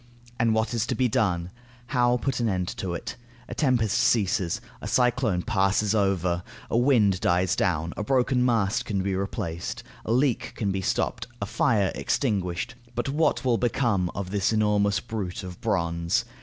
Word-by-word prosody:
And 115 -1 +3
what 110 +1 0
is 115 0 0
to - - -1
be 130 - +2
done? 90 -6 0 0.4
How 120 -1 +3
put 130 0 -2
an 115 -2 +1
end 90 -2 -1
to 90 -2 -3
it? - - -6 0.3
A - - -6
tempest 120 -7 +2
ceases, 100 -7 +2 0.2
a - - -5
cyclone 120 -7 +2
passes 100 -1 +1
over, 95 -4 +1 0.3
a - - +2
wind 110 -8 +3
dies 90 +1 +2
down, 85 -1 0
a 105 - -3
broken 125 +1 +2
mast 110 -5 +1
can 100 -3 -1
be 95 0 -1
replaced, 85 -3 -4 0.2
a - - -3
leak 125 0 +1
can 100 -3 -1
be 95 0 -2
stopped, 110 +5 -1
a 100 - -2
fire 100 -1 +2
extinguished, 100 -3 -1 0.2
but 120 +3 -1
what 150 -1 +1
will 120 -3 +2
become 115 -7 +1
of 95 -1 -4
this 100 0 +1
enormous 105 -2 +2
brute 100 -5 -5
of 90 +1 -8
bronze. 85 -6 0
105 Hz, 170 wpm, -26 LUFS, 95-120 Hz, 0.4 s, And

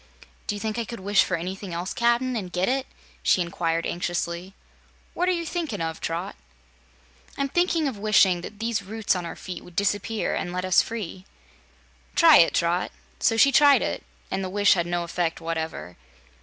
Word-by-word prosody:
"Do 210 - -1
you - - -5
think 220 +2 -3
I - - 0
could 230 -1 -8
wish 200 +1 +4
for - - -1
anything 185 +1 -5
else, 175 +2 -3
Cap'n 240 +1 +1
and 190 -5 -4
get 180 +1 0
it?" 265 +1 0 0.3
she - - +3
inquired 170 -1 -1
anxiously. 175 +1 -3 0.6
"What 360 +1 0
are - - +4
you 340 -2 -1
thinkin' 320 - -3
of, 165 -1 -3
Trot?" 165 +1 -3 1.0
"I'm 275 - 0
thinking 335 -1 +1
of 240 -7 -4
wishing 195 -4 +4
that 205 - -9
these 225 -1 -1
roots 210 +1 -1
on 175 -2 -3
our - - -7
feet 180 -2 -8
would 180 - -15
disappear, 205 +2 0
and 175 - -3
let 180 +1 -3
us 185 -1 +5
free." 195 -4 -6 0.9
"Try 330 -3 +8
it, 165 - +5
Trot." 175 +1 +1 0.3
So 225 - +2
she 275 +4 +6
tried 285 0 +6
it, - - -3 0.3
and 190 0 -1
the 185 - -3
wish 205 +1 +4
had 170 -2 -1
no 175 0 -1
effect 170 -1 -2
whatever. 160 - -4
195 Hz, 190 wpm, -25 LUFS, 175-230 Hz, 1.0 s, Try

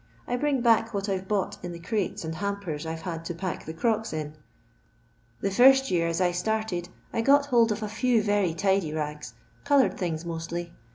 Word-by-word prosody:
I 245 - 0
bring 275 0 +1
back 225 -1 +3
what 200 0 -2
I 195 -2 0
've 190 - -13
bought 205 -2 -1
in 175 -1 -5
the 170 - -8
crates 195 -1 -2
and 160 - -3
hampers 180 -4 -4
I 160 - -3
've 160 - -9
had 165 -3 -4
to 175 - -4
pack 185 0 -4
the 160 - -6
crocks 220 +4 0
in. 150 -1 -4 1.1
The 195 - 0
first 265 +5 +6
year 170 -2 +2
as 165 +1 -1
I 180 -1 +3
started 180 -1 -2 0.2
I 230 - +1
got 280 +4 +5
hold 235 -5 +3
of 210 +1 -2
a - - -2
few 230 +1 +1
very 205 -5 +1
tidy 190 -3 +1
ngs, 150 -4 -4 0.3
coloured 285 -2 +3
things 170 -3 -2
mostly. 170 +1 -5
195 Hz, 210 wpm, -27 LUFS, 165-225 Hz, 1.1 s, first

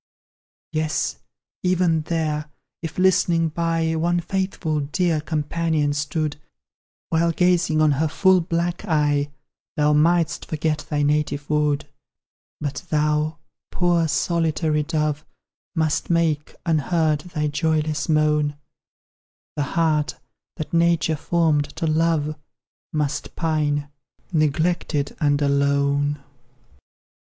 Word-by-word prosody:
Yes, 155 0 -1 0.4
even 180 -3 +2
there, 155 -2 -2 0.3
if, 165 -2 -6
listening 175 -3 +3
by, 165 0 0
One 170 +2 +1
faithful 175 -3 -2
dear 155 +2 0
companion 155 -1 0
stood, 145 +1 -2 0.7
While 165 +1 +2
gazing 170 -3 +2
on 155 - +4
her 150 +3 +1
full 190 +3 +4
bright 170 +2 -2
eye, 145 -4 +1 0.5
Thou 150 0 +3
mightst 165 +2 +2
forget 150 -1 -2
thy 145 -1 0
native 145 0 0
wood 150 -1 +1 0.7
But 145 -2 -4
thou, 150 +1 +1 0.3
poor 175 -2 +2
solitary 160 -1 +1
dove, 150 -1 -1 0.5
Must 160 -2 0
make, 165 -3 +1
unheard, 160 -1 +1
thy 155 -3 -3
joyless 155 0 0
moan; 150 -1 +2 1.0
The 150 - -1 0.2
heart 155 -3 +2 0.4
that 155 - -6
Nature 170 -1 +3
formed 155 -2 +1
to 165 +1 -2
love 155 -1 +1 0.6
Must 150 -1 -2
pine, 150 -3 0 0.5
neglected, 155 -1 0
and 145 -1 +3
alone. 140 +1 +2
155 Hz, 105 wpm, -23 LUFS, 150-165 Hz, 1.0 s, on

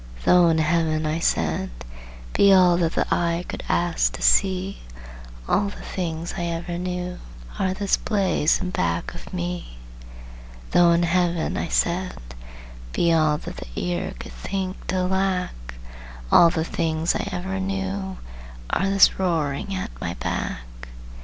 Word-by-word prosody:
"Though 180 -1 +6
in 160 - +2
Heaven," 155 0 +1
I 155 +2 -1
said, 80 - 0 0.6
"be 200 - +5
all 180 -2 +6
That 170 -2 +1
the - - +1
eye 170 0 0
could - - -5
ask 175 -1 +1
to - - -6
see, 190 0 +2 0.7
All 200 0 +2
the - - -10
things 165 -2 -4
I 175 - -1
ever 170 +1 -3
knew 180 0 -4 0.4
Are 185 -1 0
this 200 0 +1
blaze 195 -7 +1
in 180 - -3
back 85 - -1
of - - -11
me." 85 -9 -4 0.9
"Though 175 -1 +5
in 170 +1 +2
Heaven," 175 -1 +1
I - - -2
said, 180 +2 0 0.8
"be 170 -1 +3
all 155 -2 +3
That - - -8
the - - -8
ear 90 -1 -2
could - - -9
think 185 - -4
to 185 0 0
lack, 180 - -1 0.6
All 170 - +8
the 160 -1 -1
things 160 0 0
I - - -2
ever 190 +1 -3
knew 195 0 -3 0.5
Are 195 +1 +1
this 195 -1 +5
roaring 165 0 -1
at 190 +4 -4
my 85 - -3
back." - - -3
175 Hz, 150 wpm, -23 LUFS, 160-190 Hz, 0.9 s, All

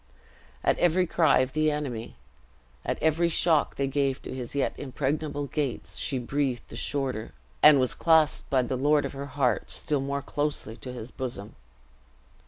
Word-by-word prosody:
At - - +2
every 175 +1 +3
cry 165 -6 +4
of 130 0 -2
the 155 0 +2
enemy, 135 -7 -4 0.7
at - - -2
every 160 +2 +3
shock 160 -2 +3
they 140 - 0
gave 135 -1 0
to - - -6
his 130 0 -5
yet 140 - +1
impregnable 145 +2 -2
gates, 140 -3 -3
she 135 - -1
breathed 130 0 -2
the - - -9
shorter, 130 -6 -2 0.3
and 150 -2 +8
was 130 -1 +1
clasped 160 -2 +3
by 130 -2 +3
the 130 +1 -2
lord 145 +3 +3
of - - -5
her 140 +1 -6
heart 130 -2 0
still 145 -3 -1
more 140 0 -2
closely 145 -7 -2
to 125 - -7
his 125 -1 -8
bosom. 120 -5 -6
140 Hz, 170 wpm, -27 LUFS, 130-150 Hz, 0.7 s, and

